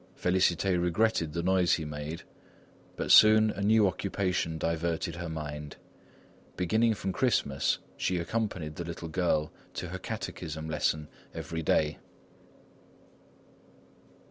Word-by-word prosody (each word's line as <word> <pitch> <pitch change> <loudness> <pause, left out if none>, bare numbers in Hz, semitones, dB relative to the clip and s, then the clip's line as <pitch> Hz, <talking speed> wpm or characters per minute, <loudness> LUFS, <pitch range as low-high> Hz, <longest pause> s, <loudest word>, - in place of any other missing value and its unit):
Félicité 90 0 +2
regretted 90 -2 +1
the 85 0 -2
noise 90 -1 +3
he 80 - 0
made, 75 +2 -6 0.7
but - - -2
soon 110 0 +8
a 100 - -6
new 105 0 +4
occupation 90 -3 -1
diverted 85 +1 -2
her 85 -1 -5
mind; 75 -2 -6 0.8
beginning 110 +6 +2
from 95 -1 -3
Christmas, 90 - +1 0.2
she 90 - 0
accompanied 85 -5 -3
the 85 - -3
little 85 0 -6
girl 80 -3 0 0.2
to 90 - -4
her 95 +2 -5
catechism 80 -7 -5
lesson 75 -1 0 0.3
every 80 0 -4
day. 75 -1 +1
85 Hz, 115 wpm, -29 LUFS, 80-95 Hz, 0.8 s, soon